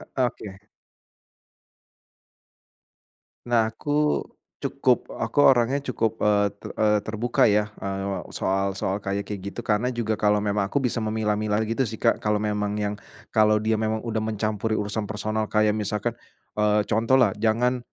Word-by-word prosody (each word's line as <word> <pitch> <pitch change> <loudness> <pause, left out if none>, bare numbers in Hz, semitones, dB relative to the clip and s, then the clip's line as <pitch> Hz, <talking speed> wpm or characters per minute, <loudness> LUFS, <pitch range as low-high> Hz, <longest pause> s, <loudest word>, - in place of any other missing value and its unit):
Oke. 110 -6 -2 2.9
Nah, 115 -2 +2
aku 150 +5 0 0.4
cukup - - +1
aku - - -2
orangnya 130 +1 +4
cukup, 115 -5 -2
eee, 105 -1 +3
te - - -8
eee, 105 -1 +3
terbuka, 115 +2 +2
ya, 105 0 +2
eee, 95 -2 -3
soal 95 0 0
soal 95 +1 -2
kayak 100 0 -2
kayak 105 -2 -6
gitu. - - -8
Karena 110 +3 +1
juga 110 -2 -1
kalau 105 0 +2
memang 100 -1 0
aku 140 +5 -1
bisa 120 -1 0
memilah-milah 110 -1 0
gitu 115 +3 0
sih, 110 - -5
Kak. - - +2
Kalau 105 0 0
memang 105 -1 -1
yang 105 0 -2 0.3
kalau 110 -1 +4
dia 110 0 +1
memang 110 0 -1
udah 115 -2 -2
mencampuri 110 0 -1
urusan 105 0 -2
personal 110 +1 -2
kayak 105 -1 +3
misalkan, 105 -1 -1 0.5
eee, 105 0 +3
contohlah, 115 +1 +3
"Jangan 120 +3 +2
110 Hz, 145 wpm, -25 LUFS, 105-115 Hz, 2.9 s, orangnya